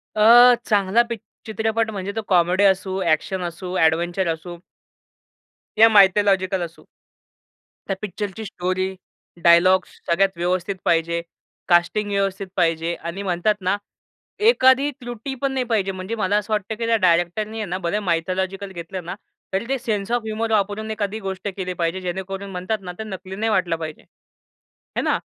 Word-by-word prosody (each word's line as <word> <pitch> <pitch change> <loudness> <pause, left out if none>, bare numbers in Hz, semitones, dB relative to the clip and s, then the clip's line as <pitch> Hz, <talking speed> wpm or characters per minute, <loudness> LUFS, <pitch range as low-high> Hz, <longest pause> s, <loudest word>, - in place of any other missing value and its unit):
अ, 240 +3 +8
चांगला 205 +1 +3
पी 235 - -1 0.3
चित्रपट 220 +1 -1
म्हणजे, 200 -1 -4
तो 225 - -1
कॉमेडी 180 +1 +3
असू, 190 -1 +2
एक्शन 175 +2 0
असू, 180 +2 -5
एडव्हेंचर 170 +3 +2
असू 175 +2 -9 1.2
या 225 +1 +8
मायथॉलॉजिकल 195 -2 +4
असू. 170 -1 -7 1.0
त्या 195 - -1
पिक्चरची 205 +1 -5
स्टोरी, 185 0 -2 0.5
डायलॉग्स 180 +2 +5 0.2
सगळ्यात 195 +3 +3
व्यवस्थित 180 +2 -1
पाहिजे. 170 0 +1 0.5
कास्टिंग 180 +4 +2
व्यवस्थित 195 -1 -1
पाहिजे 165 -1 +1
आणि 175 +4 -6
म्हणतात 185 +3 +1
ना, 185 +2 +1 0.6
एखादी 280 - +5
त्रुटी 240 +2 -6
पण 275 -1 0
नाही 260 -1 -1
पाहिजे. 210 -5 0
म्हणजे 190 +4 -5
मला 205 -1 +1
असं 210 +1 -2
वाटतं 210 +1 -2
की 230 +1 -3
त्या 230 - +3
डायरेक्टरनी 185 +4 +1
आहे 215 - -2
ना 180 - -2
बरं 205 +5 0
मायथॉलॉजिकल 190 +3 -2
घेतलं 175 +1 -7
ना. 175 - -5 0.4
तरी 195 +4 0
ते 270 - +1
सेन्स 215 -3 -2
ऑफ 240 -1 +1
ह्युमर 220 +1 -2
वापरून 210 +1 0
एखादी 215 0 -3
गोष्ट 195 -1 -5
केली 185 -1 -3
पाहिजे, 170 +2 -1
जेणेकरून 190 +2 -5
म्हणतात 185 +4 -2
ना, 180 -2 -6
ते - - -3
नकली 190 -2 -7
नाही 225 +2 -1
वाटलं 185 -5 +1
पाहिजे. 155 -2 -7
आहे - - -12
ना? - - +2
190 Hz, 155 wpm, -22 LUFS, 180-215 Hz, 1.2 s, अ